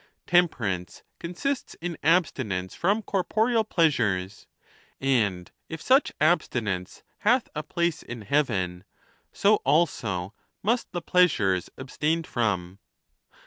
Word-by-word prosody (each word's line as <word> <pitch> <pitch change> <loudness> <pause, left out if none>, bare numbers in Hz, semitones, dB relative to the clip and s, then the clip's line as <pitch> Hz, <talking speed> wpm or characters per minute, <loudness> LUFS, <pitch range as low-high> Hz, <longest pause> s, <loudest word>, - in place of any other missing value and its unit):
Tem 175 0 +5
perance 95 - -5 0.2
consists 245 +11 -3
in 175 0 -5
abstinence 130 - +1
from 205 +5 0
corporeal 220 +5 +1
pleasures, 105 - 0 0.5
and 105 -10 0 0.2
if 160 - -6
such 265 - +3
abstinence 120 - 0 0.2
hath 235 +3 +2
a 150 - -3
place 170 +1 -1
in 120 -1 -8
heaven, 95 -9 0 0.5
so 210 +1 +3
also 115 - 0 0.3
must 235 +4 0
the 175 -2 -4
pleasures 115 - +2
abstained 155 +5 -1
from. 100 - -2
150 Hz, 105 wpm, -26 LUFS, -, 0.5 s, Tem